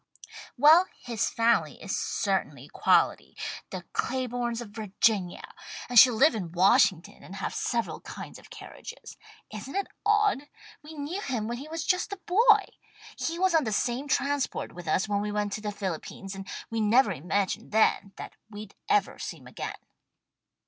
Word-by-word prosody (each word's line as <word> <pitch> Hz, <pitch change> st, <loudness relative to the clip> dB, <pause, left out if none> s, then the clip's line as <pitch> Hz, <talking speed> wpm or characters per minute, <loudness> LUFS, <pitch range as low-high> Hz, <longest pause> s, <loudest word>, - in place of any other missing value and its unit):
Well, 315 Hz, +7 st, +7 dB
his 235 Hz, -3 st, -2 dB
family 230 Hz, 0 st, +1 dB
is -, -, -3 dB
certainly -, -, -2 dB
quality, -, -, +2 dB, 0.3 s
the -, -, -6 dB
Claibornes 245 Hz, -2 st, -2 dB
of 240 Hz, -3 st, -7 dB
Virginia, 205 Hz, -3 st, -1 dB, 0.4 s
and 245 Hz, -2 st, +7 dB
she'll 250 Hz, 0 st, +8 dB
live 275 Hz, +5 st, +5 dB
in 185 Hz, -7 st, -4 dB
Washington 185 Hz, -1 st, +3 dB
and 190 Hz, -, -10 dB
have -, -, -4 dB
several 235 Hz, -2 st, -2 dB
kinds -, -, -9 dB
of -, -, -17 dB
carriages. -, -, -10 dB, 0.4 s
Isn't 215 Hz, -, -7 dB
it 395 Hz, -, 0 dB, 0.2 s
odd? 420 Hz, -9 st, +2 dB, 0.3 s
We 310 Hz, +1 st, -11 dB
knew 305 Hz, +7 st, -4 dB
him 240 Hz, -, -2 dB
when 240 Hz, +1 st, -4 dB
he 285 Hz, -, -8 dB
was 325 Hz, +1 st, -4 dB
just 365 Hz, +3 st, +1 dB
a 400 Hz, -, -4 dB
boy. 420 Hz, +3 st, +4 dB, 0.5 s
He 330 Hz, +1 st, -3 dB
was 375 Hz, 0 st, +2 dB
on 320 Hz, -2 st, +4 dB
the 220 Hz, -, -2 dB
same 245 Hz, +6 st, -1 dB
transport 285 Hz, 0 st, -1 dB
with 175 Hz, -1 st, -10 dB
us 190 Hz, +7 st, +1 dB
when 205 Hz, -1 st, 0 dB
we 210 Hz, 0 st, -2 dB
went 205 Hz, -1 st, -1 dB
to 215 Hz, -, -4 dB
the 210 Hz, -1 st, -3 dB
Philippines, 195 Hz, 0 st, -5 dB
and 195 Hz, 0 st, -8 dB, 0.2 s
we 225 Hz, -1 st, -1 dB
never 215 Hz, +1 st, +4 dB
imagined 185 Hz, +4 st, -2 dB
then 210 Hz, -2 st, +2 dB
that -, -, -8 dB, 0.2 s
we'd 210 Hz, -1 st, -9 dB, 0.2 s
ever 415 Hz, -1 st, +2 dB
see -, -, -5 dB
him -, -, -18 dB
again." -, -, -7 dB
235 Hz, 170 wpm, -28 LUFS, 205-295 Hz, 0.5 s, she'll